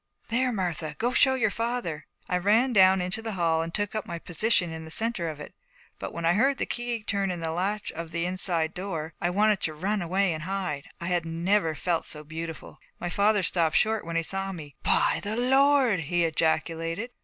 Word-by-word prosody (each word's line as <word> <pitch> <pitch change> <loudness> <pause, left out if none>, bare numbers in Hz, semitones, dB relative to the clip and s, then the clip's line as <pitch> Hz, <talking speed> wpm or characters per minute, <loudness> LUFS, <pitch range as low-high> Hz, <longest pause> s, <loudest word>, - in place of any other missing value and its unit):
'There, 250 +2 +2
Martha! 170 -7 -3
Go 245 +2 0
show 265 0 +5
your 230 -5 +1
father.' 230 -10 -3 0.2
I 180 - 0
ran 225 +7 +3
down 190 -2 +6
into 180 +5 -1
the 225 -1 -4
hall 165 -3 +1
and 165 +1 -4
took 205 +2 -2
up 215 -2 -3
my 170 - -4
position 175 0 +1
in 160 0 -7
the 160 - -10
centre 205 -2 0
of 155 -2 -7
it; 150 - -9 0.5
but - - -5
when 170 0 -4
I 170 - +4
heard 270 +8 +2
the - - -1
key 240 -2 -3
turn 200 -2 -1
in 180 -1 -3
the 165 -1 -3
latch 195 +5 -2
of 165 0 -6
the 170 +1 -2
inside 175 -3 -1
door 165 -4 -4
I 175 - +1
wanted 210 +2 +2
to 155 - -2
run 200 +6 -1
away 185 +1 +1
and 155 - -5
hide. 180 -5 -3
I 170 - -5
had 175 -2 +1
never 165 +1 0
felt 165 +3 -1
so 150 0 +1
beautiful. 160 +1 -7 0.2
My 175 - -3
father 205 0 +3
stopped 165 -2 +1
short 220 0 +2
when 170 0 -5
he 165 - +1
saw 195 +3 -2
me. 150 -6 -9
'By - - +3
the 210 +2 -2
Lord!' 265 -3 +4
he 170 +2 0
ejaculated. 165 +6 -1
180 Hz, 215 wpm, -27 LUFS, 165-215 Hz, 0.5 s, down